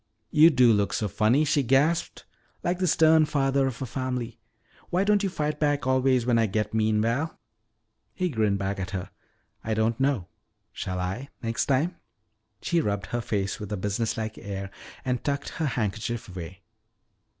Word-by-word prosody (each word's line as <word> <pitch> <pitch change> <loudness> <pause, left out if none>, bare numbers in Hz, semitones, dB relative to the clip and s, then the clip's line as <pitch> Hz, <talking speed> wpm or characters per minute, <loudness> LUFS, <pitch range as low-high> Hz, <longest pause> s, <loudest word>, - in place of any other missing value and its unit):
"You 155 +2 +7
do 125 -6 +5
look 100 -3 +1
so 105 - 0
funny," 115 - +2
she 145 0 +2
gasped, 140 +6 +1 0.4
"like 175 +1 0
the 185 - +1
stern 160 -1 +5
father 135 -2 +1
of 130 0 -4
a - - -2
family. 125 -2 -4 0.5
Why 180 +2 +2
don't 205 0 +3
you 195 - 0
fight 150 -3 -2
back 145 -3 +1
always 130 -2 +2
when 120 -2 +3
I 115 - +3
get 105 +2 -2
mean, 110 -1 +2
Val?" 135 +8 -1 0.8
He 185 -1 0
grinned 110 -7 +1
back 95 0 -2
at 95 0 -3
her. 90 - -7 0.5
"I 110 0 -1
don't 110 +2 +1
know. 135 -8 +1 0.5
Shall 90 0 -4
I, 95 +10 -3
next 115 0 -1
time?" 150 +7 +1 0.7
She 170 -1 +2
rubbed 100 -6 -2
her 120 - 0
face 100 -4 -2
with 105 -1 -7
a 105 - -1
businesslike 110 +3 -2
air 100 -2 -6 0.3
and 125 -2 -1
tucked 140 -1 -2
her 160 - -2
handkerchief 115 -1 -2
away. 90 0 -8
120 Hz, 170 wpm, -26 LUFS, 105-145 Hz, 0.8 s, You